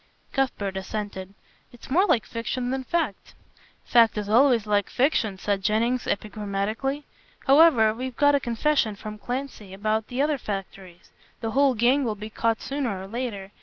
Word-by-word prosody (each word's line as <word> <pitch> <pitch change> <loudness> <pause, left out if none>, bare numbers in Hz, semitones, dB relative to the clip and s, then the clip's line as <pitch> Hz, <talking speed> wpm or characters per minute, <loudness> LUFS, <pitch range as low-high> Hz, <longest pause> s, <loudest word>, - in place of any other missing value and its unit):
Cuthbert 230 -8 -1
assented. 195 -1 -5 0.4
"It's 240 +2 -14
more 370 +8 +4
like 230 - +2
fiction 245 +2 -3
than 265 0 -2
fact." 305 - -2 0.5
"Fact 230 -3 +4
is 210 -1 -3
always 240 -1 +4
like 205 -1 +1
fiction," 245 -7 +1
said 200 0 -1
Jennings 230 +5 0
epigrammatically, 215 +7 -2 0.4
"however, 270 -7 +6
we've 255 +2 -5
got 290 0 +4
a 285 - +4
confession 235 -2 0
from 215 +1 -8
Clancy 245 -5 -5
about 215 +2 -1
the 250 - -5
other 290 0 +1
factories. 195 -4 -7 0.3
The 225 -1 -2
whole 275 +1 +3
gang 250 +5 +3
will 220 -4 -1
be 210 +1 -8
caught 225 +1 0
sooner 265 -8 -2
or 190 - -7
later. 205 -4 -5
225 Hz, 160 wpm, -25 LUFS, 205-265 Hz, 0.5 s, however